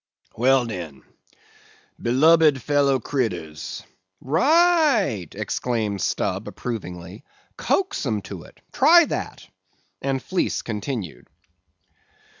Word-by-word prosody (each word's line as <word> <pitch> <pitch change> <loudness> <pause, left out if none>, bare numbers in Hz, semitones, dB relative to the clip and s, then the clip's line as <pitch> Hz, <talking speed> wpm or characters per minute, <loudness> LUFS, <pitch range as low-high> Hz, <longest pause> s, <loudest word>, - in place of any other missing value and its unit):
"Well, 130 +2 +3
den, 85 - -7 1.0
Belubed 150 +3 +4
fellow 140 -1 +2
critters:"— 90 - -4 0.4
"Right!" 250 - +3
exclaimed 110 -5 -2
Stubb, 100 +1 -2
approvingly, 95 -4 -7 0.3
"coax 390 0 -1
'em - - -1
to - - -8
it; - - -19
try 340 +1 +6
that," - - -5 0.5
and 135 -1 -1
Fleece 185 +7 -2
continued. 110 - -5
130 Hz, 85 wpm, -23 LUFS, 100-160 Hz, 1.0 s, try